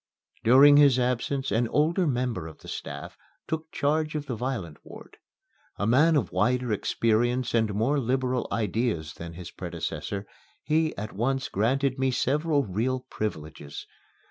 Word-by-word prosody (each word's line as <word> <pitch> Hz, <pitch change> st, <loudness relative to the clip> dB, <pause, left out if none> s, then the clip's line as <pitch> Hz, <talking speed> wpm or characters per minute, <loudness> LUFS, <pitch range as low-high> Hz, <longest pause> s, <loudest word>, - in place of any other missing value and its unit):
During 140 Hz, +5 st, +7 dB
his 140 Hz, -3 st, +6 dB
absence 125 Hz, +2 st, -1 dB
an 115 Hz, +3 st, +2 dB
older 165 Hz, -, +2 dB
member 125 Hz, -, -1 dB
of 80 Hz, -, -12 dB
the -, -, -13 dB
staff 70 Hz, 0 st, -6 dB, 0.3 s
took 160 Hz, 0 st, -4 dB
charge 155 Hz, +2 st, 0 dB
of 150 Hz, -1 st, -3 dB
the 130 Hz, -4 st, -3 dB
violent 110 Hz, -, -4 dB
ward. -, -, -13 dB, 0.6 s
A 100 Hz, -, -1 dB
man 150 Hz, +9 st, +4 dB
of 140 Hz, -, 0 dB
wider 125 Hz, +5 st, +1 dB
experience 120 Hz, +4 st, +1 dB
and 110 Hz, -2 st, +2 dB
more 130 Hz, +8 st, +1 dB
liberal 130 Hz, 0 st, 0 dB
ideas 110 Hz, -7 st, -1 dB
than 85 Hz, 0 st, -8 dB
his 85 Hz, 0 st, -9 dB
predecessor, 100 Hz, 0 st, -5 dB, 0.4 s
he 155 Hz, +1 st, +1 dB
at 105 Hz, +2 st, -5 dB
once 135 Hz, +5 st, -1 dB
granted 130 Hz, +6 st, 0 dB
me 135 Hz, 0 st, +2 dB
several 145 Hz, +4 st, +1 dB
real 120 Hz, +7 st, -1 dB
privileges. 80 Hz, -8 st, -5 dB
125 Hz, 145 wpm, -27 LUFS, 105-140 Hz, 0.6 s, During